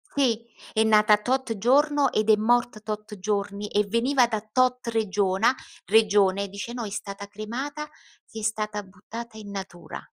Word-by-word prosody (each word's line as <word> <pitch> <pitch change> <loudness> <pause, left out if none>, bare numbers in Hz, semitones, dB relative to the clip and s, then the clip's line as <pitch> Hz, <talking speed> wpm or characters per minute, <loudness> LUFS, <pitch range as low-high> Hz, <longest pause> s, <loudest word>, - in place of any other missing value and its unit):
sì 235 -5 +1 0.3
è 220 - +3
nata 215 -1 +5
tot 250 0 -1
giorno 285 +6 +3
ed 215 +1 0
è 215 - +8
morta 240 0 +1
tot 215 -1 -6
giorni, 200 +1 -2
e 210 0 +2
veniva 245 +3 +3
da 220 -3 -2
tot 255 -1 +2
regiona 210 0 +2 0.3
regione, 200 -1 +3
dice: 200 +4 -6
"No, 240 -2 -4
è - - -5
stata 200 -1 -6
cremata, 245 +9 -5
ed 225 -6 -13
è - - -8
stata 215 -1 -2
buttata 220 +4 -10
in 210 -2 -9
natura." 190 -3 -7
215 Hz, 160 wpm, -25 LUFS, 205-240 Hz, 0.3 s, è